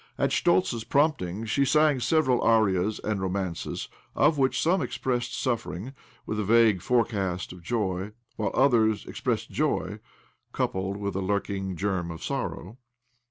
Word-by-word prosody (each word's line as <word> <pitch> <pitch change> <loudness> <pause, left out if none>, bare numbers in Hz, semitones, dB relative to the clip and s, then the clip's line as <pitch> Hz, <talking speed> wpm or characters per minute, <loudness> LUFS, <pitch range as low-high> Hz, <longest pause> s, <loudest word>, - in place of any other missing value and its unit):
At - - +1
Schtoltz's 170 -10 +2
prompting 115 - 0
she 125 +6 +1
sang 150 0 +3
several 130 -1 +2
arias 105 -3 +2
and 105 -2 -1
romances, 95 -2 -3 0.3
of 150 +1 +4
which 130 -2 +2
some 180 +4 +2
expressed 120 -2 -2
suffering, 120 -2 -3 0.3
with 110 - -3
a - - 0
vague 110 -2 +4
forecast 100 -7 0
of 90 - -12
joy, 95 -1 -2 0.2
while 105 -3 -1
others 115 -5 +3
expressed 115 -3 -3
joy, 110 -9 -1 0.5
coupled 95 +1 -1
with 100 -2 -3
a 95 - -1
lurking 95 -1 -2
germ 95 -1 -1
of 80 -1 -7
sorrow. 105 +9 -4
110 Hz, 140 wpm, -27 LUFS, 95-125 Hz, 0.5 s, of